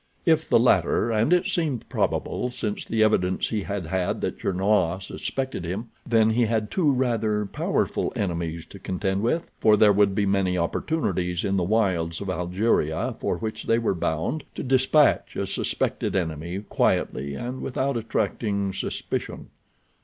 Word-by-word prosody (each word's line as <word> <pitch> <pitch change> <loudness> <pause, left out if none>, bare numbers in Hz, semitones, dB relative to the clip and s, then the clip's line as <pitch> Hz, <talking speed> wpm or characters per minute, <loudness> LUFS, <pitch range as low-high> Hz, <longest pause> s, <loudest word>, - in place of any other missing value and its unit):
If - - +3
the - - +6
latter, 115 - +3
and 110 +7 +2
it 180 0 +4
seemed 150 -9 -1
probable 125 - -1
since 105 -4 -3
the 110 -1 +2
evidence 95 -4 +1
he 110 -2 -1
had 100 -2 -4
had 90 +2 -1
that - - -3
Gernois 95 -2 +1
suspected 130 +2 -4
him, 100 +7 -4 0.2
then 110 -2 +4
he 120 +1 +3
had 110 -1 -1
two 160 -6 +2
rather 115 -5 0
powerful - - -1
enemies 85 -3 -2
to 100 - -10
contend 95 +1 -2
with, 140 +9 -1
for 110 -1 +5
there 105 -1 +6
would 100 -1 +3
be 100 - +2
many 95 -2 +1
opportunities 90 - -1
in 100 -1 0
the 95 - +1
wilds 90 -5 +1
of 100 -2 -3
Algeria, 90 -2 0
for - - -1
which 110 -1 -5
they 115 - +3
were 115 -3 +1
bound, 85 - -2
to - - -4
dispatch 130 +3 +3
a - - -1
suspected - - -1
enemy 85 +1 -2
quietly 70 +2 0
and 125 - -5
without 135 +1 -1
attracting 105 -3 -1
suspicion. 95 - -4
100 Hz, 160 wpm, -25 LUFS, 90-115 Hz, 0.2 s, the